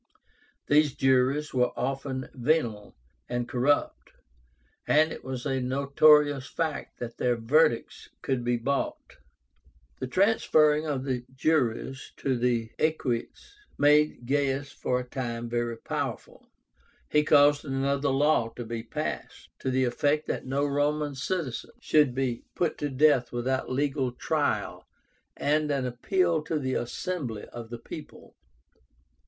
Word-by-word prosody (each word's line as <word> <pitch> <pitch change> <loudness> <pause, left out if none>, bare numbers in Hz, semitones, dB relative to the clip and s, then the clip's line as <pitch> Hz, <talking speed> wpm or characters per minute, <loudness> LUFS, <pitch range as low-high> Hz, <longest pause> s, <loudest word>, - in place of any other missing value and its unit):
These 145 -1 +3
juries 135 +3 +2
were 125 -1 +2
often 130 0 -3
venal 120 -6 -1 0.3
and 120 -1 -2
corrupt, 130 +4 0 0.7
and 155 +2 +4
it - - -8
was 130 -2 -5
a 135 -1 0
notorious 140 +1 +4
fact 160 -3 -3
that 120 -1 -7
their 125 -1 +1
verdicts 120 +2 +1
could 130 -3 -1
be 120 0 +1
bought. 135 +4 -3 0.8
The 130 - -3
transferring 155 - +3
of 140 -3 -2
the 130 -3 -2
juries 135 -2 0
to 135 -2 0
the 120 -2 0
Equites 155 - -2 0.2
made 150 -3 +3
Gaius 140 +1 0
for 125 - -1
a - - -4
time 120 -3 -4
very 120 0 -2
powerful. - - -5 0.6
He 150 - +3
caused 145 -1 +5
another 140 0 0
law 135 -3 +2
to 120 - -6
be 115 0 -4
passed, 115 - -5
to 130 - -2
the 130 0 +2
effect 145 +5 +1
that - - -4
no 140 +2 0
Roman 145 +1 0
citizen 140 -1 -3
should 150 -5 +3
be 130 -3 -1
put 170 -3 -1
to 145 - -1
death 135 -3 +3
without 130 +2 -1
legal 135 -1 0
trial 125 - -2 0.5
and 150 +1 +1
an 140 -3 0
appeal 165 +7 +1
to 160 - -1
the 130 -3 -2
assembly 125 - -3
of 120 -1 -9
the 120 - -6
people. - - -11
135 Hz, 135 wpm, -27 LUFS, 125-150 Hz, 0.8 s, caused